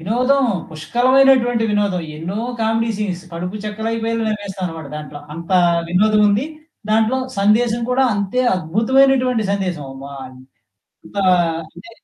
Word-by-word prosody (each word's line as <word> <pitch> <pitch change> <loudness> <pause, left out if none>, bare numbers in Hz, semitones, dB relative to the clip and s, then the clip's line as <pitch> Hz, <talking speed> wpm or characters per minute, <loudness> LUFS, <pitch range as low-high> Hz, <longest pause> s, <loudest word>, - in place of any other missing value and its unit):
వినోదం. 255 +9 +2 0.3
పుష్కలమైనటువంటి 245 +7 +3
వినోదం 200 -4 0
ఎన్నో 175 +6 -5 0.2
కామెడీ 225 +1 +1
సీన్స్, 185 -4 -3
కడుపు 180 +4 -5
చెక్కలైపోయేలా 225 +1 -2
నవ్వేస్తారన్నమాట 185 -7 -5
దాంట్లో. 150 -1 -8
అంత 170 +3 -6 0.4
వినోదముంది. 210 +4 +3 0.5
దాంట్లో 220 +4 +2 0.2
సందేశం 225 +3 +2
కూడా 260 +1 +3
అంతే 200 +5 -1 0.2
అద్భుతమైనటువంటి 250 +6 +2
సందేశం. 180 -8 -3 0.2
మా 140 - -8 0.9
ఎంత - - -15 0.5
అంటే 175 +8 -14
215 Hz, 105 wpm, -19 LUFS, 180-235 Hz, 0.9 s, పుష్కలమైనటువంటి